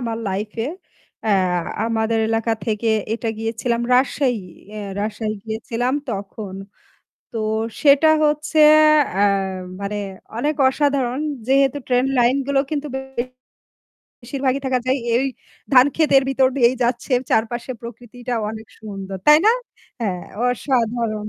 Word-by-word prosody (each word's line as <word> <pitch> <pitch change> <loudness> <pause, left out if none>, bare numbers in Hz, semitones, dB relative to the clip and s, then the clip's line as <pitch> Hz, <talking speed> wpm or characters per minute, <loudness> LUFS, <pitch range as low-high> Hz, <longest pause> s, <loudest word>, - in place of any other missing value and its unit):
আমার 225 - -2
লাইফ 205 +3 -3
এ। - - -2 0.6
অ্যা 215 - +2 0.5
আমাদের 225 0 0
এলাকা 225 0 0
থেকে 220 +1 -1 0.3
এটা 230 -1 -3
গিয়েছিলাম 230 +1 -1
রাজশাহী। 250 -5 +1 0.2
অ্যা 215 0 -7 0.2
রাজশাহী 215 +1 -2
গিয়েছিলাম 230 +3 -2 0.2
তখন। 200 -1 -6 0.8
তো 230 - -5 0.4
সেটা 290 +1 +6 0.2
হচ্ছে 300 +1 0 0.6
অ্যা 200 +2 +3 0.6
মানে 200 +1 -3 0.4
অনেক 295 +6 0
অসাধারণ 270 -2 0 0.3
যেহেতু 275 +1 +3
ট্রেন 250 0 +2
লাইন 245 +2 +4
গুলো 275 -1 +2
কিন্তু 300 -1 -2
বেশির 265 -2 -4 0.9
বেশির 255 +3 -6
ভাগই 265 +2 +2
থাকা 260 -1 +1
যায় 260 +1 +2 0.2
এই 260 - +2 0.5
ধান 255 0 +7
ক্ষেতের 295 -4 +4
ভিতর 270 -1 +3
দিয়েই 240 -1 +4
যাচ্ছে 240 +2 -1 0.2
চারপাশে 235 +3 0
প্রকৃতিটা 245 +1 -7 0.2
অনেক 220 0 -8
সুন্দর। 195 -3 -7
তাই 300 0 +8
না? - - +8 0.5
হ্যাঁ 185 -6 -2 0.2
অসাধারণ। 235 -4 -1
240 Hz, 125 wpm, -21 LUFS, 220-265 Hz, 0.9 s, তাই